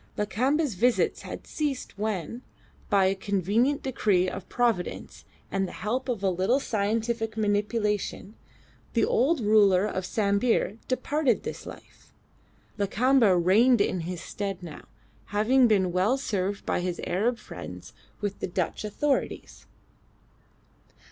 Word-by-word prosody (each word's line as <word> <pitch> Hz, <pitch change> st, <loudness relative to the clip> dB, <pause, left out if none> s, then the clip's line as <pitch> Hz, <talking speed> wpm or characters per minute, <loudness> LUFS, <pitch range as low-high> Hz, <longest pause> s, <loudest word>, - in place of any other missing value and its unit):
Lakamba's 255 Hz, +7 st, +1 dB
visits 240 Hz, +6 st, +1 dB
had -, -, -8 dB
ceased 290 Hz, -4 st, -3 dB
when, 210 Hz, +1 st, -3 dB, 0.5 s
by 200 Hz, -2 st, +4 dB
a 190 Hz, -, +3 dB
convenient 205 Hz, -, 0 dB
decree 205 Hz, -8 st, +1 dB
of 185 Hz, -, -6 dB
Providence 235 Hz, -7 st, -1 dB, 0.3 s
and 195 Hz, -1 st, 0 dB
the -, -, -9 dB
help 250 Hz, +7 st, -3 dB
of 225 Hz, -5 st, -2 dB
a 195 Hz, -, +3 dB
little 190 Hz, +9 st, +1 dB
scientific 225 Hz, 0 st, -1 dB
manipulation, 210 Hz, -1 st, -1 dB, 0.6 s
the 230 Hz, -, +3 dB
old 275 Hz, +4 st, +2 dB
ruler 205 Hz, -3 st, +4 dB
of 190 Hz, -3 st, -2 dB
Sambir 210 Hz, +1 st, +1 dB
departed 265 Hz, -1 st, 0 dB
this -, -, -6 dB
life. -, -, -13 dB, 0.7 s
Lakamba 220 Hz, 0 st, +3 dB
reigned 215 Hz, +8 st, +4 dB
in 185 Hz, -2 st, +1 dB
his 170 Hz, +1 st, -5 dB
stead 195 Hz, -1 st, -5 dB
now, 165 Hz, -4 st, -10 dB, 0.4 s
having 240 Hz, +5 st, +3 dB
been 190 Hz, -5 st, +2 dB
well 190 Hz, +9 st, +2 dB
served 200 Hz, -6 st, -2 dB
by -, -, 0 dB
his 180 Hz, -1 st, -3 dB
Arab 230 Hz, +7 st, 0 dB
friends -, -, -9 dB, 0.3 s
with 205 Hz, -1 st, -3 dB
the -, -, -2 dB
Dutch 180 Hz, +1 st, -2 dB
authorities. 270 Hz, +7 st, -2 dB
210 Hz, 130 wpm, -27 LUFS, 190-245 Hz, 0.7 s, by